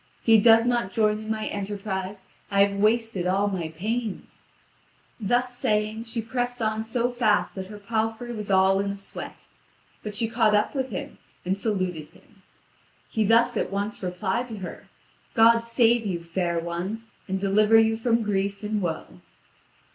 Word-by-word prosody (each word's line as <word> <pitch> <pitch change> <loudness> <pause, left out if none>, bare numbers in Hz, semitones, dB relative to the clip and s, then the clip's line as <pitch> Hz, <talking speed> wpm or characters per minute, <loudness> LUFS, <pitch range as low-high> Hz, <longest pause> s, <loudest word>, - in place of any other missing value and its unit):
If - - -33
he 225 -1 +7
does 225 +1 +6
not 240 -5 0
join 215 +1 +2
in 215 0 -8
my 220 -1 -2
enterprise, 195 -1 -4 0.2
I 200 0 +5
have 200 0 -4
wasted 215 -3 +1
all 195 +2 +2
my 185 -5 -2
pains." 215 +6 -5 0.7
Thus 245 +4 0
saying, 215 0 -1
she 230 0 -4
pressed 245 +1 -2
on 220 -1 -1
so 240 +2 -1
fast 235 -4 +1
that 190 -1 -6
her 210 +1 -9
palfrey 225 +3 -2
was 210 -3 -6
all 190 0 +4
in 200 0 -1
a 200 - -4
sweat; 195 - -9 0.6
but 210 -1 -6
she 225 +1 +1
caught 225 -2 +3
up 210 - +1
with 265 -2 -2
him 280 +2 -6 0.3
and 185 +1 +1
saluted 185 -7 -2
him. - - -23 0.7
He 220 - +1
thus 230 +3 +4
at - - -1
once 200 +2 -3
replied 190 +6 -2
to 225 -3 -7
her: 185 -3 -8 0.5
"God 230 +1 +6
save 230 0 +2
you, 170 -3 -3
fair 170 0 -1
one, 175 +6 -3 0.2
and 190 0 -1
deliver 210 +3 +4
you 225 0 +4
from 230 0 +1
grief 200 0 -1
and 210 0 -1
woe." 160 - -4
215 Hz, 170 wpm, -25 LUFS, 195-230 Hz, 0.7 s, he